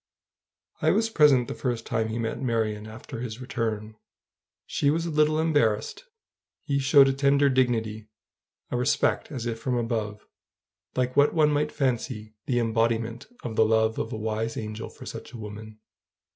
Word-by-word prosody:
I - - +3
was 225 0 +2
present 140 - +5
the - - -4
first 120 -3 -3
time 110 0 0
he 110 +1 -3
met 115 -1 -3
Marion 110 -4 -1
after 110 +2 -8
his 115 -1 -5
return. 110 -4 -3 0.7
She 140 - +1
was 165 +3 +1
a 170 - -3
little 155 0 +3
embarrassed: 145 - +1 0.6
he 140 -1 0
showed 135 0 +6
a 135 - +2
tender 140 +1 +3
dignity, 110 -4 0 0.6
a 125 - 0
respect 125 +5 +1
as 125 -5 -4
if 115 -1 -3
from 125 +1 -1
above, 110 -3 -2 0.7
like 125 0 0
what 145 +3 +4
one 150 -2 +4
might 150 +1 +1
fancy 120 -5 -2
the 125 - +1
embodiment 115 0 0 0.2
of 115 -3 -4
the 110 - +5
love 110 0 +2
of 115 - -3
a - - -3
wise 110 +1 -2
angel 110 +1 -5
for - - -12
such - - -8
a - - -7
woman. 110 0 -9
115 Hz, 170 wpm, -26 LUFS, 110-135 Hz, 0.7 s, showed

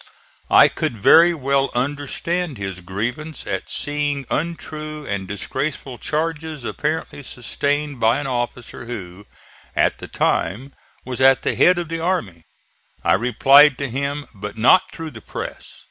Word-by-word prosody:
I - - +8
could 115 - -3
very 165 - +7
well 140 -1 +1
understand 145 +4 -2
his 95 -2 -5
grievance 120 - -4
at - - -4
seeing 145 -1 -2
untrue 155 -2 -4
and 100 -4 -3
disgraceful 130 +5 -4
charges 155 -2 -2
apparently 150 +3 -3
sustained 140 +2 -2
by 115 +3 +3
an 145 - -4
officer 120 -2 -4
who, 100 -4 -8 0.5
at - - +2
the - - -8
time, 130 +8 -1 0.3
was 130 0 -4
at 135 0 +5
the - - 0
head 180 0 +5
of 175 -1 -2
the 165 0 -3
army. 120 - -2 0.6
I - - +3
replied 135 +5 +6
to 140 -1 -3
him, 140 +3 -2
but 105 +1 -7
not 135 +11 +5
through 165 -2 -7
the - - -11
press. - - -7
140 Hz, 145 wpm, -21 LUFS, 120-155 Hz, 0.6 s, I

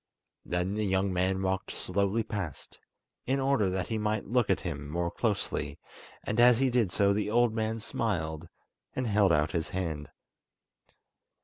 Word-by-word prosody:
Then 90 +2 -1
the 105 +1 -1
young 95 0 +1
man 95 +1 +1
walked 95 0 -1
slowly 100 +3 0
past, 100 - -6 0.5
in 135 +2 +1
order 135 -7 +2
that 95 0 -2
he 110 -1 -1
might 105 0 -1
look 120 0 +1
at - - +2
him 70 0 -5
more 85 +2 -1
closely, 105 -5 -2 0.5
and 110 - -1
as 120 -1 +7
he 130 0 +2
did 115 -7 +2
so 100 +1 +3
the 105 +1 -1
old 120 0 +3
man 110 0 -1
smiled, 85 -8 -2 0.5
and 130 - -1
held 105 -4 +3
out 75 -1 +2
his 80 -2 -2
hand. 80 -5 -3
100 Hz, 165 wpm, -29 LUFS, 90-115 Hz, 0.5 s, as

